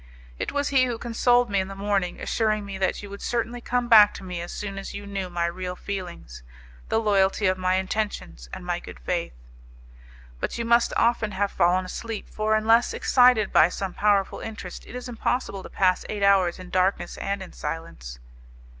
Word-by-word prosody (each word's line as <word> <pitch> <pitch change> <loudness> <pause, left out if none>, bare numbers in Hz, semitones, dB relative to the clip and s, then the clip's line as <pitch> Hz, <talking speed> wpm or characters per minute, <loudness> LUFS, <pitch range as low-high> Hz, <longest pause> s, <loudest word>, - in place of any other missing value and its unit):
It - - -2
was 285 0 -1
he 265 -2 +4
who 240 -2 -3
consoled 240 0 +2
me 200 - +2
in 190 - -1
the 195 - -8
morning 195 -2 -1
assuring 215 -2 0
me 195 -1 -6
that 190 +2 -1
you 205 - -8
would 200 - -8
certainly 240 0 -2
come 245 0 -1
back 215 -3 +7
to - - -9
me 180 -2 -5
as 175 - -6
soon 195 -1 -5
as 195 - -7
you 205 - -7
knew 195 -2 -4
my 175 -1 -1
real 180 +1 -4
feelings, 175 - -7 0.5
the 225 - +2
loyalty 205 -1 +2
of 185 -1 +3
my 185 0 +1
intentions 190 - -3
and - - -8
my - - -1
good - - -11
faith." - - -2 1.0
"But - - -3
you 235 - -2
must 235 +1 +4
often 230 -3 +2
have 200 +1 0
fallen 180 +2 +2
asleep, 225 +3 -6
for 215 0 +1
unless 225 +2 +3
excited 245 -5 +4
by 155 - +6
some 190 0 -4
powerful 200 -2 +1
interest, 215 -5 -8
it - - -10
is 250 - -6
impossible 240 -3 -2
to - - -10
pass 185 -1 +2
eight 205 -1 -3
hours 190 -3 +4
in 185 -1 -11
darkness 185 -1 +1
and 200 0 -2
in 185 - -12
silence." 60 - -6
200 Hz, 200 wpm, -25 LUFS, 185-225 Hz, 1.0 s, back